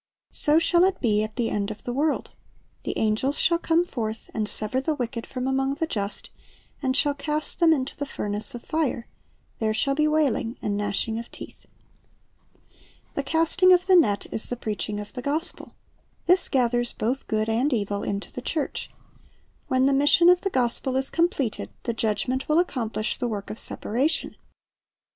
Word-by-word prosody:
So 300 +1 +3
shall 345 +2 +4
it 385 0 0
be 210 -4 +2
at 215 0 -4
the 235 -2 -1
end 200 0 -1
of 215 - -8
the 245 - -3
world: 295 +4 0 0.5
the - - -4
angels 220 +6 +1
shall 335 0 +3
come 340 +1 +2
forth, 225 -8 -5
and 215 -1 -2
sever 220 +5 -1
the 305 +3 -1
wicked 235 -3 -4
from 255 -1 -4
among 270 +1 0
the 325 - -1
just, 205 -9 -3 0.5
and 260 -2 +1
shall 290 0 +3
cast 300 +1 -3
them 335 -2 +6
into 270 -4 0
the 285 - -4
furnace 210 -2 -1
of 235 - -8
fire: 295 -7 -1 0.5
there 220 -1 0
shall 275 +5 +2
be 305 +2 +2
wailing 285 -6 +1
and 205 - -2
gnashing 205 +2 -1
of 235 - -8
teeth." - - -11 1.5
The - - -1
casting 325 +6 +3
of 360 0 +3
the 375 -1 +5
net 210 - +4
is 220 - +1
the 245 - -2
preaching 210 -2 -3
of 205 0 -8
the 250 - -5
gospel. 305 +7 -3 0.5
This 360 +1 +3
gathers 240 -2 +1
both 250 +5 -2
good 215 -1 0
and 240 +6 +1
evil 205 -4 -1
into 200 0 -4
the 250 - -5
church. 300 +3 -3 0.8
When 260 0 +2
the 275 - +4
mission 290 +5 +6
of 360 0 +5
the 390 - -1
gospel 255 -2 0
is 265 0 0
completed, 330 - 0
the 235 - -1
Judgment 230 +5 -1
will 305 - +4
accomplish 240 -10 -1
the 245 - 0
work 205 -3 -4
of 215 - -7
separation. 270 +9 -1
255 Hz, 180 wpm, -25 LUFS, 220-305 Hz, 1.5 s, them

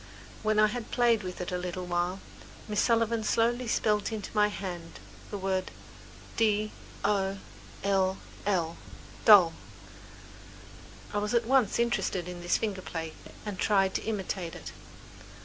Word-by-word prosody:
When 215 0 +1
I 215 - +7
had 220 +2 -3
played 235 -3 +3
with 185 -2 -6
it 180 - -4
a 180 - -1
little 180 0 -4
while, 175 +2 -1 0.5
Miss 210 -1 +1
Sullivan 230 -1 +2
slowly 235 +3 +1
spelled 210 -1 +1
into 215 -3 -5
my 210 0 +5
hand 175 -5 -6 0.3
the 205 - -4
word 190 -1 -1 0.7
"d 215 -1 +2 0.3
o 195 -1 +1 0.5
l 190 -1 +2 0.3
l." 170 -5 0 2.4
I - - 0
was 210 +3 -1
at 235 -1 +3
once 255 -3 +3
interested 235 -6 0
in 180 -1 -7
this 175 - +2
finger 205 -4 -2
play 165 -3 -5 0.3
and 205 -3 -5
tried 195 -2 +3
to - - -1
imitate 190 -5 -3
it. - - -8
205 Hz, 140 wpm, -29 LUFS, 185-220 Hz, 2.4 s, I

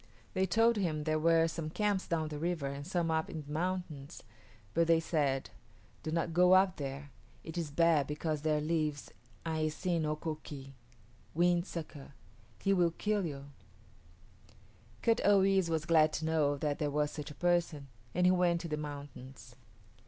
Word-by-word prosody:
They 190 0 +1
told 225 +4 +3
him 160 -6 -1
there 155 0 0
were 165 +1 +4
some 160 -1 -4
camps 200 +3 0
down 160 -3 -1
the 150 -1 -5
river 170 -2 -1
and 140 +2 -5
some 175 -3 0
up 160 0 0
in 155 -2 -6
the 145 - -11
mountains, 170 -3 -4 0.5
but 165 0 +2
they 165 -1 +5
said, 145 -5 -1 0.5
"Do - - -5
not 165 +1 -1
go 180 +2 +5
up 190 0 +4
there. 140 0 -6 0.3
It 160 - -8
is 170 -3 -2
bad 160 -1 +3
because 150 0 -2
there 155 -1 +1
lives 155 -2 -1 0.3
[=A]i 160 -1 0
s[=i]n´ 165 +1 -1
o 150 - 0
k[=o] 155 0 -4
k[=i] 135 -2 -9 0.6
Wind 175 +2 +2
Sucker. 150 -4 -8 0.5
He 195 - +3
will 175 -3 +2
kill 210 -3 0
you." 140 -1 -8 1.5
Kut 230 0 +3
o 200 -1 +5
yis´ 190 -2 +3
was 160 -2 -1
glad 155 -2 +4
to 160 - -2
know 150 -3 +1
that 145 0 -2
there 150 - 0
was 150 0 0
such 150 -1 -6
a 150 - -10
person, 170 -5 0 0.3
and 180 +1 +3
he 180 - +6
went 175 -2 +2
to 170 - -5
the 150 -1 -2
mountains. 135 -5 -8
160 Hz, 180 wpm, -32 LUFS, 150-175 Hz, 1.5 s, he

